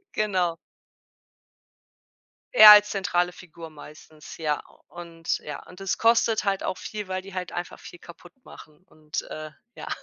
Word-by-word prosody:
Genau. 185 -5 0 2.0
Er 215 -1 +11
als 210 0 +8
zentrale 180 -2 -1
Figur 170 -2 -12
meistens, 155 0 -14
ja. 150 -2 -2 0.3
Und, 170 -1 -5
ja, 150 - -9
und 180 +2 -15
es 195 -2 -2
kostet 230 -1 +2
halt 195 -1 -1
auch 185 - -4
viel, 210 -3 -7
weil 185 0 -3
die 195 0 -13
halt 180 -1 -5
einfach 175 0 -7
viel 175 - -13
kaputt 175 +1 -15
machen 150 -1 -15
und, 155 -4 -7
äh, 155 0 -9 0.2
ja. - - -9
175 Hz, 150 wpm, -25 LUFS, 160-195 Hz, 2.0 s, Er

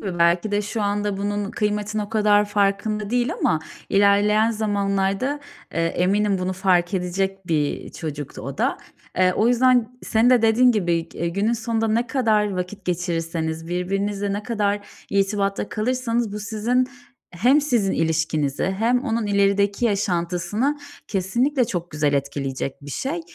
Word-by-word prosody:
gibi 185 -4 -4
belki 170 +4 +3
de 205 0 +1
şu 210 +1 -3
anda 205 0 -1
bunun 205 0 -2
kıymetinin 210 0 -1
o 205 - -6
kadar 210 -2 +3
farkında 205 +1 0
değil 245 0 +1
ama 160 - +2 0.3
ilerleyen 205 +2 +4
zamanlarda, 205 +4 0 0.3
eee, 165 0 +1
eminim 195 +3 +1
bunu 185 +1 -1
fark 185 0 +1
edecek 190 +1 -2
bir 150 -3 -1
çocuktu 150 -3 -6
o - - -6
da. - - +1 0.4
Eee, 185 0 +4
o 220 +5 +2
yüzden 250 +1 +5
n 225 - -9 0.2
senin 230 +3 +3
de 245 -3 +5
dediğin 240 +3 +5
gibi, 170 -5 0
e 170 - -2
günün 200 +6 0
sonunda 225 -1 -1
ne 235 +3 +1
kadar 220 -5 +2
vakit 185 +1 -5
geçirirseniz, 165 -2 -2
birbirinizle 195 +3 -1
ne 205 +1 -3
kadar 205 -3 -1 0.2
irtibatta 200 0 0
kalırsanız 230 +1 -1
bu 210 - -4
sizin 230 +4 0 0.4
hem 245 - +3
sizin 235 -9 +1
ilişkinizi 160 -3 0
hem 245 +3 +2
onun 225 -1 -1
ilerideki 200 +2 +2
yaşantısını 200 - 0 0.3
kesinlikle 240 +8 +1
çok 175 -6 -4
güzel 150 -1 0
etkileyecek 140 -1 -2
bir 145 - -9
şey. 295 - -3
205 Hz, 150 wpm, -23 LUFS, 180-220 Hz, 0.4 s, yüzden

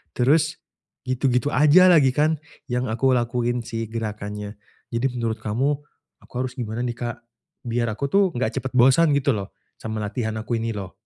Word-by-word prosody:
Terus, 155 +6 +2 0.5
gitu-gitu 130 +1 +1
aja 150 +7 +6
lagi 145 -7 +6
kan 155 +2 +2 0.3
yang 125 0 -1
aku 130 +3 +2
lakuin 120 0 0
sih, 115 -2 -4
gerakannya. 105 -2 -5 0.3
Jadi 125 +2 0
menurut 115 -1 -2
kamu, 135 +7 0 0.4
aku - - -21
harus 130 0 -4
gimana 115 +1 -3
nih 120 - -1
Kak? 120 0 -4 0.5
Biar 120 0 0
aku 140 +7 -3
tuh, 200 0 +5
enggak 125 - -1
cepet 130 - -5
bosan 135 +6 +5
gitu 140 0 +2
loh 100 -2 -5 0.2
sama 110 -1 -4
latihan 110 +1 -3
aku 115 +1 -2
ini 115 0 -2
loh. 95 -2 -6
120 Hz, 170 wpm, -23 LUFS, 110-135 Hz, 0.5 s, aja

